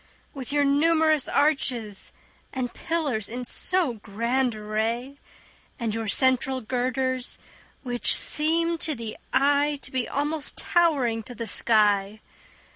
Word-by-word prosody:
With 270 Hz, -4 st, -6 dB
your 290 Hz, 0 st, +2 dB
numerous 310 Hz, +1 st, +3 dB
arches 250 Hz, -8 st, 0 dB, 0.4 s
and 255 Hz, -2 st, -3 dB
pillars 295 Hz, -, -2 dB
in 245 Hz, +2 st, -5 dB
so 350 Hz, +1 st, 0 dB
grand 235 Hz, +4 st, 0 dB
array 225 Hz, +6 st, -3 dB, 0.6 s
And 230 Hz, -3 st, -2 dB
your 225 Hz, 0 st, -3 dB
central 260 Hz, +3 st, +2 dB
girders, 255 Hz, +1 st, -2 dB, 0.5 s
which 245 Hz, -2 st, +2 dB
seem 330 Hz, +2 st, +1 dB
to 310 Hz, -2 st, 0 dB
the 225 Hz, -3 st, -6 dB, 0.2 s
eye 285 Hz, +2 st, +3 dB
To -, -, -7 dB
be 255 Hz, -2 st, -2 dB
almost 295 Hz, +1 st, -2 dB
towering 280 Hz, -10 st, +2 dB
to 245 Hz, +3 st, -9 dB
the 230 Hz, -, -4 dB
sky. 210 Hz, -2 st, +2 dB
260 Hz, 120 wpm, -25 LUFS, 230-290 Hz, 0.6 s, numerous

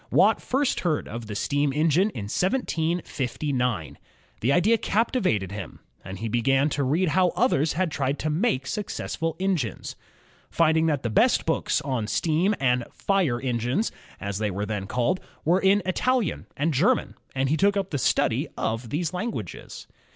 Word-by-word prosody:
Watt -, -, +4 dB
first 270 Hz, +1 st, 0 dB
heard 160 Hz, -4 st, -1 dB
of 115 Hz, 0 st, -7 dB
the 105 Hz, -, -5 dB
steam 145 Hz, +5 st, 0 dB
engine 160 Hz, +7 st, +2 dB
in 115 Hz, -, -6 dB
1759. 140 Hz, -, -1 dB, 0.4 s
The 125 Hz, -, +1 dB
idea 210 Hz, +9 st, +4 dB
captivated 190 Hz, -, 0 dB
him, 100 Hz, -4 st, -7 dB, 0.2 s
and 95 Hz, +1 st, -7 dB
he 115 Hz, -, -4 dB
began 135 Hz, +6 st, +2 dB
to 145 Hz, -1 st, -1 dB
read 160 Hz, +7 st, +1 dB
how 185 Hz, +3 st, +3 dB
others 160 Hz, -, +2 dB
had 175 Hz, +1 st, 0 dB
tried 140 Hz, 0 st, -1 dB
to 155 Hz, -, -2 dB
make 155 Hz, -, 0 dB
successful 165 Hz, -3 st, -3 dB
engines. 180 Hz, -, -2 dB, 0.5 s
Finding 160 Hz, 0 st, +3 dB
that 145 Hz, -4 st, 0 dB
the 120 Hz, -, -1 dB
best -, -, +3 dB
books -, -, 0 dB
on 130 Hz, -6 st, -2 dB
steam 165 Hz, -, +1 dB
and 125 Hz, -2 st, +2 dB
"fire 180 Hz, -12 st, 0 dB
engines," 125 Hz, -, 0 dB, 0.3 s
as 100 Hz, 0 st, -4 dB
they 105 Hz, -1 st, 0 dB
were 100 Hz, +2 st, -3 dB
then 105 Hz, -2 st, -4 dB
called, 125 Hz, -, 0 dB, 0.3 s
were 175 Hz, +4 st, +4 dB
in 195 Hz, +1 st, +4 dB
Italian 235 Hz, +2 st, 0 dB
and 155 Hz, +3 st, +1 dB
German, 200 Hz, -, +2 dB, 0.2 s
he 135 Hz, +3 st, +1 dB
took 200 Hz, +4 st, +3 dB
up 195 Hz, -1 st, -2 dB
the 145 Hz, -, -1 dB
study -, -, +1 dB
of 115 Hz, +1 st, -2 dB
these 160 Hz, +6 st, -2 dB
languages. 180 Hz, -, -5 dB
150 Hz, 160 wpm, -25 LUFS, 120-185 Hz, 0.5 s, Watt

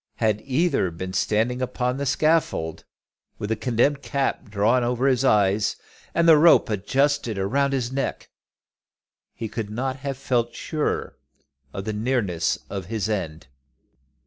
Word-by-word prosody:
Had 110 Hz, -2 st, 0 dB
either 140 Hz, -, +1 dB
been 95 Hz, +3 st, -6 dB
standing 110 Hz, +6 st, 0 dB
upon 125 Hz, 0 st, -1 dB
the 140 Hz, 0 st, -2 dB
scaffold, 140 Hz, -, +1 dB, 0.5 s
with 105 Hz, -, -5 dB
the -, -, +2 dB
condemned 125 Hz, +5 st, +1 dB
cap 135 Hz, -1 st, -2 dB
drawn 110 Hz, +5 st, +2 dB
over 125 Hz, +2 st, 0 dB
his 130 Hz, -1 st, +2 dB
eyes 105 Hz, -4 st, +3 dB, 0.4 s
and 170 Hz, 0 st, +3 dB
the 160 Hz, -2 st, +8 dB
rope 160 Hz, -6 st, +5 dB
adjusted 130 Hz, +3 st, 0 dB
around 135 Hz, +9 st, +1 dB
his 130 Hz, -3 st, -1 dB
neck, 135 Hz, 0 st, -3 dB, 1.0 s
he 115 Hz, -, -4 dB
could 110 Hz, -1 st, -5 dB
not 130 Hz, +5 st, -3 dB
have 135 Hz, -1 st, -4 dB
felt 120 Hz, -3 st, -1 dB
surer 155 Hz, -2 st, -3 dB, 0.5 s
of 95 Hz, +4 st, -6 dB
the 110 Hz, -, -2 dB
nearness 105 Hz, -6 st, 0 dB
of 95 Hz, -3 st, -6 dB
his 110 Hz, -2 st, -2 dB
end. 85 Hz, -8 st, -3 dB
120 Hz, 145 wpm, -24 LUFS, 105-135 Hz, 1.0 s, the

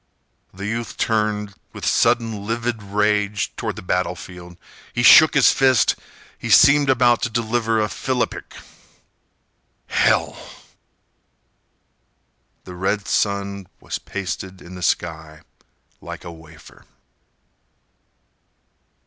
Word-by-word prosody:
The 95 Hz, +1 st, -8 dB
youth 115 Hz, +2 st, -4 dB
turned, 105 Hz, -2 st, -1 dB, 0.2 s
with -, -, -7 dB
sudden, 115 Hz, -3 st, +1 dB
livid 115 Hz, 0 st, -2 dB
rage, 105 Hz, 0 st, -1 dB
toward -, -, -4 dB
the -, -, -9 dB
battlefield. 90 Hz, -1 st, -4 dB, 0.4 s
He 120 Hz, -, -1 dB
shook 155 Hz, +5 st, +8 dB
his 135 Hz, -, +6 dB
fist. 130 Hz, -5 st, +3 dB, 0.4 s
He -, -, -6 dB
seemed 140 Hz, 0 st, +6 dB
about 120 Hz, -2 st, +3 dB
to 125 Hz, -, -1 dB
deliver 115 Hz, -1 st, 0 dB
a 105 Hz, -, +1 dB
philippic. 125 Hz, +3 st, -3 dB, 1.3 s
"Hell—" -, -, +1 dB, 2.2 s
The 90 Hz, -, -10 dB
red 95 Hz, +3 st, -2 dB
sun 100 Hz, -2 st, -1 dB
was -, -, -5 dB
pasted 95 Hz, -1 st, -6 dB
in 90 Hz, -, -12 dB
the 90 Hz, -, -9 dB
sky 80 Hz, -1 st, -2 dB, 0.6 s
like -, -, -9 dB
a 85 Hz, -, -8 dB
wafer. 80 Hz, -1 st, -16 dB
105 Hz, 105 wpm, -21 LUFS, 95-115 Hz, 2.2 s, shook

